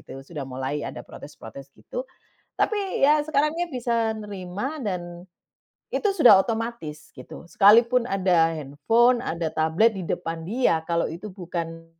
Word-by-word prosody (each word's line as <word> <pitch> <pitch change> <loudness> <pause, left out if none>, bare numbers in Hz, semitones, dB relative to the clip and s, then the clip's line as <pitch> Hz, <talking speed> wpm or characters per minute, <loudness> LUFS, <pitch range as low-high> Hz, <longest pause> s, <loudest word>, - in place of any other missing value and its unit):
Gitu, - - -11
sudah 140 -3 -7
mulai 130 +3 -3
ada - - -7
protes-protes 135 -1 -11
gitu. - - -7 0.5
Tapi, 395 -9 +1
ya 300 0 +4
sekarang 300 +1 +1
dia 345 0 -3
bisa 235 -3 0
nerima 205 - -5
dan 175 -4 -5 0.7
itu 415 - +1
sudah 250 - +7
otomatis, 225 -10 -5
gitu. 130 +5 -11
Sekalipun 235 +7 +4
ada 180 -4 +3
handphone, 165 - +2
ada 165 -7 -3
tablet 160 +9 +2
di 195 - -5
depan 165 -1 -4
dia, 185 -2 +1
kalau 170 0 +1
itu 175 +6 -7
bukan 170 -3 -6
195 Hz, 140 wpm, -24 LUFS, 165-245 Hz, 0.7 s, sudah